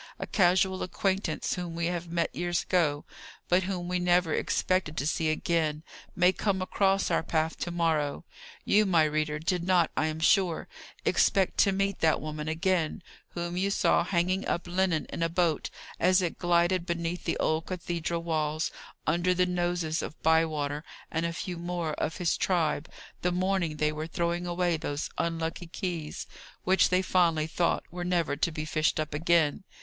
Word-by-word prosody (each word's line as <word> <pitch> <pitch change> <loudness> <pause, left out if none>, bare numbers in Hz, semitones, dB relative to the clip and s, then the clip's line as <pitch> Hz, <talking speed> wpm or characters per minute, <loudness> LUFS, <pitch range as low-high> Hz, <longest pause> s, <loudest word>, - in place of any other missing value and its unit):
A - - -4
casual 190 -1 +2
acquaintance 190 -3 -1
whom 175 -2 -4
we 170 0 -1
have 175 0 -2
met 170 -1 -1
years 175 -2 -1
ago, 155 -5 +1 0.4
but 180 +1 +4
whom 180 -2 -3
we 180 0 0
never 175 -2 +2
expected 185 -4 0
to 135 - -1
see 160 +1 +1
again, 155 -1 0 0.3
may 180 +1 +4
come 195 -2 0
across 195 +1 +1
our - - +2
path 160 0 -1
to - - -2
morrow. 160 -4 0 0.4
You, 210 0 +4
my 170 -4 +4
reader, 155 0 0
did 170 +3 -1
not, 180 -2 +3
I 155 - +1
am 155 0 -3
sure, 175 0 +2 0.4
expect 195 -2 +2
to 200 - +5
meet 195 0 -1
that 160 -1 +3
woman 150 0 -5
again, 170 0 0 0.3
whom 175 0 -3
you 190 +2 +1
saw 195 - +3
hanging 185 +2 0
up 175 - -1
linen 180 -3 0
in - - -5
a 165 - +2
boat, 170 -2 0 0.3
as 185 +2 +4
it 175 -3 -2
glided 175 0 +2
beneath 170 +1 -3
the - - 0
old 155 +1 0
cathedral 170 -2 -3
walls, 155 -1 -1 0.3
under 175 +3 +2
the 180 0 +3
noses 175 -2 -1
of 155 - -7
Bywater 155 -2 +1 0.3
and 165 +1 0
a - - -3
few 175 +1 -5
more 170 -2 -3
of 160 - -2
his 175 -2 +1
tribe, 160 -4 0 0.3
the 180 - +1
morning 180 -3 0
they 150 0 +1
were 155 +1 -4
throwing 170 0 -1
away 175 -1 +1
those 145 -1 -4
unlucky 165 +1 -2
keys, 165 -4 -4 0.4
which 190 +1 +4
they 185 +1 +2
fondly 170 -5 +2
thought 170 +2 0
were 175 0 -5
never 175 -4 0
to 165 +3 0
be 155 0 -4
fished 155 0 +1
up 155 -1 -2
again. 165 +1 +2
170 Hz, 175 wpm, -28 LUFS, 160-180 Hz, 0.4 s, to